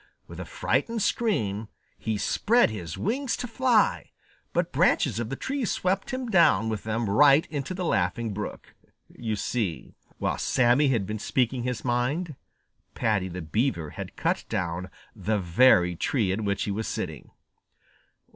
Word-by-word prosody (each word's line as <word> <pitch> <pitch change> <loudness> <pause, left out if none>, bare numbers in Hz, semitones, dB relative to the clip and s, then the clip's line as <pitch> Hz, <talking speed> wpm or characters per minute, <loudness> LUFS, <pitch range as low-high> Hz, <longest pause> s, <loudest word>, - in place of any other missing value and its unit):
With - - -11
a - - -5
frightened 230 -3 -1
scream, 110 - 0 0.3
he 110 -1 -3
spread 225 - +2
his 85 -7 -6
wings 255 +5 -1
to 245 - -4
fly, 235 -2 +2 0.4
but - - 0
branches 105 - +2
of 115 -2 -3
the 135 - -3
tree 270 - -3
swept 190 -2 -1
him 255 -1 -3
down 115 - +4
with 110 -2 -4
them 110 +1 -1
right 140 +8 +5
into 145 +4 -3
the 180 -1 -3
Laughing 110 - 0
Brook. 105 +1 -6 0.4
You 110 -2 -4
see 105 -4 -3 0.2
while - - -1
Sammy 130 +3 +3
had 115 -7 +1
been 105 +2 -4
speaking 125 +3 0
his 125 -1 -3
mind, 135 +7 -1 0.6
Paddy 105 -4 +1
the 90 -1 -6
Beaver 85 - -1
had - - -8
cut - - 0
down 90 +1 -2 0.3
the 105 +1 -1
very 90 -1 +4
tree 105 - 0
in 105 +3 -2
which 100 -1 0
he 100 - -2
was 110 +2 -3
sitting. - - -5
115 Hz, 155 wpm, -26 LUFS, 100-160 Hz, 0.6 s, right